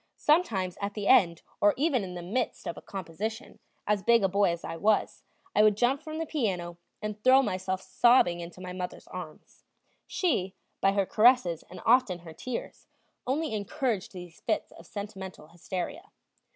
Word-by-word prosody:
Sometimes 210 - +1
at 200 0 -3
the 205 -2 -3
end 175 -9 +4 0.2
or 205 0 +5
even 275 -5 +2
in 180 -1 -6
the 175 - -6
midst 235 +8 -2
of 170 - -3
a - - -10
composition, 200 +6 -6 0.3
as 210 -1 +1
big 235 0 +4
a - - +5
boy 200 +1 +2
as 170 0 -3
I 165 - -5
was, 210 +5 +1 0.3
I - - +6
would 210 -1 +5
jump 250 +4 +2
from 310 0 -6
the 325 - -2
piano, 180 - -2 0.2
and 210 0 -5
throw 260 +1 +7
myself 190 -3 -2
sobbing 190 -3 +4
into 175 +2 -9
my 180 -1 -6
mother's 180 -1 -6
arms. 175 -4 -10 0.4
She, 200 - 0 0.3
by 195 - +4
her 200 -1 +2
caresses 215 -6 +4
and - - -10
often 230 -6 +4
her 160 - -9
tears, 245 +8 -6 0.4
only 295 +1 0
encouraged 210 0 -2
these 175 -3 -10
fits 215 - -1
of - - -15
sentimental 190 -6 -7
hysteria. 215 - -5
200 Hz, 175 wpm, -28 LUFS, 180-245 Hz, 0.4 s, throw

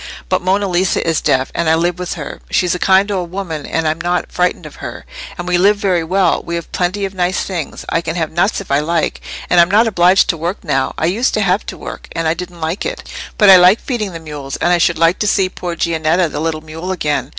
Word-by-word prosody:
"But - - +1
Monna 195 +3 +1
Lisa 180 -1 0
is 165 -3 +1
deaf, 130 0 +1
and 170 -2 0
I 160 - +5
live 175 +2 0
with 180 -1 -3
her. 155 -4 -7
She's 180 -2 +1
a 180 - -3
kind 195 +3 +3
old 180 -3 -2
woman, 170 -5 -5
and 165 -1 -1
I'm 160 +1 -1
not 175 +1 -1
frightened 180 0 0
at - - -9
her. - - -8 0.3
And 175 -1 -6
we 180 -1 +2
live 205 +3 +4
very 185 -5 +1
well: 185 +3 +1
we 170 - -4
have 170 -1 -6
plenty 185 +3 -1
of 195 - -6
nice 180 0 0
things. 175 -6 -5
I 165 - 0
can 165 0 -4
have 160 -3 -2
nuts 175 +6 +1
if 195 - -9
I 140 - +3
like. 160 +1 -1 0.3
And 180 - +4
I'm 170 0 +5
not 215 +4 +4
obliged 185 -3 +4
to 165 - +1
work 170 +7 -4
now. 140 -6 -1
I - - 0
used 215 +9 +1
to 215 - +1
have 195 +1 +1
to - - -6
work, - - -8
and 165 -1 -1
I 160 - +2
didn't 175 0 -8
like 160 +4 -2
it; - - -5 0.3
but 205 -3 +7
I 185 - +10
liked 180 +4 +5
feeding 220 -7 -3
the 165 - -7
mules, 145 -4 -7
and 175 - +1
I 175 - +3
should 170 0 +2
like 165 +3 +3
to 210 - 0
see 190 -2 +2
poor 175 -2 -5
Giannetta, 165 +1 +1
the - - -4
little 160 -1 -2
mule, 160 +4 -6
again. 150 -5 -1
175 Hz, 260 wpm, -16 LUFS, 165-190 Hz, 0.3 s, I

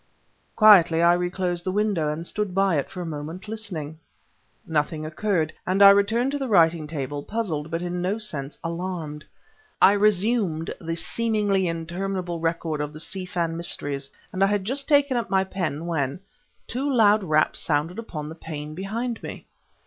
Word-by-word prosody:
Quietly, 180 -6 +7
I 170 0 +6
reclosed 175 0 -1
the 185 - -1
window, 195 -7 +1
and 160 +2 -5
stood 205 0 -3
by 195 -3 +3
it 140 - -4
for 180 - -7
a - - -4
moment 160 +5 -6
listening. 175 -9 -5 0.7
Nothing 155 0 -1
occurred, 160 0 -1
and 190 +2 +4
I 200 - +11
returned 220 +6 +2
to 285 - -2
the 270 - -2
writing 165 -6 +3
table, 145 -2 -4
puzzled 165 -6 -3
but 165 +2 -3
in 175 0 -3
no 190 +4 0
sense 150 -10 -4
alarmed. 165 -3 -4 0.6
I - - +7
resumed 205 -4 +1
the 165 -1 -3
seemingly 205 -1 0
interminable 175 +1 -3
record 165 -2 -1
of 150 0 -4
the 155 - -9
Si 185 +3 -4
Fan 170 -2 -1
mysteries, 145 -5 -2 0.2
and 190 +1 +1
I - - +5
had 205 -1 0
just 270 +5 -2
taken 285 -3 +4
up 235 - -2
my 190 0 +3
pen, 170 -5 -3
when... 145 -2 -2 0.4
two 275 +4 -2
loud 215 -4 +4
raps 155 -3 +2
sounded 160 +6 -1
upon 155 -10 -6
the 155 - -7
pane 155 -2 -7
behind 225 +7 -4
me. - - -8
175 Hz, 170 wpm, -24 LUFS, 160-205 Hz, 0.7 s, I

